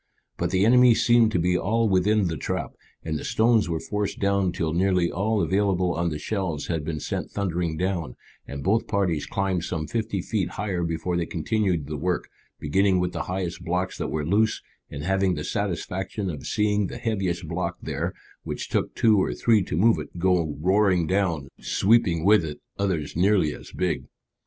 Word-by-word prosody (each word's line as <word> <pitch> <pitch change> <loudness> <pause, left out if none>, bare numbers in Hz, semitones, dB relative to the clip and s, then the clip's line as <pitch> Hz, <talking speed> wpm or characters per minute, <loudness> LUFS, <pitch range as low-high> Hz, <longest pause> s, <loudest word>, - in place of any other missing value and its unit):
But - - -1
the 95 +2 +2
enemy 125 0 +6
seemed 120 -1 +4
to - - +2
be 90 +2 +2
all 115 +5 +1
within 100 +2 +3
the 80 - -2
trap, 70 - -3 0.3
and 80 -2 -2
the - - -7
stones 110 -3 +2
were 80 -1 -1
forced 105 +2 -3
down 100 -2 +1
till 80 -4 -2
nearly 90 -1 +2
all 105 +3 0
available 95 0 +1
on 85 +1 0
the 75 - -3
shelves 85 -3 -3
had 80 -3 -2
been 75 0 -3
sent - - -4
thundering 85 -5 -2
down, 90 -7 -2 0.3
and 70 -1 -6
both 110 +4 +1
parties 90 -7 0
climbed 95 -3 -1
some 80 -3 -3
fifty 110 +3 -2
feet 95 -6 -1
higher 95 -3 -2
before 85 +1 -2
they 85 - -1
continued 90 -2 0
the 75 +1 -5
work, 90 +4 -2 0.3
beginning 95 +5 +2
with 90 0 0
the - - -4
highest 90 -2 -3
blocks 90 +2 -1
that - - -2
were 75 -1 -2
loose, 105 +6 +1 0.3
and 70 - -6
having 95 0 +1
the 75 - -4
satisfaction 95 0 -3
of 75 -4 -7
seeing 105 -1 +1
the 120 - -7
heaviest 95 -8 -2
block 85 +1 -3
there, - - -3 0.3
which - - -5
took - - -1
two 110 -3 +4
or - - -1
three 115 -3 +3
to 85 - -3
move 110 +5 +4
it, - - -8
go 85 -4 +1
roaring 95 0 +3
down, 85 -6 0
sweeping 95 -6 +2
with 105 -3 +6
it 75 -2 -6 0.2
others 90 -8 -1
nearly 90 -4 +3
as - - -11
big. - - -1
95 Hz, 190 wpm, -25 LUFS, 85-100 Hz, 0.3 s, enemy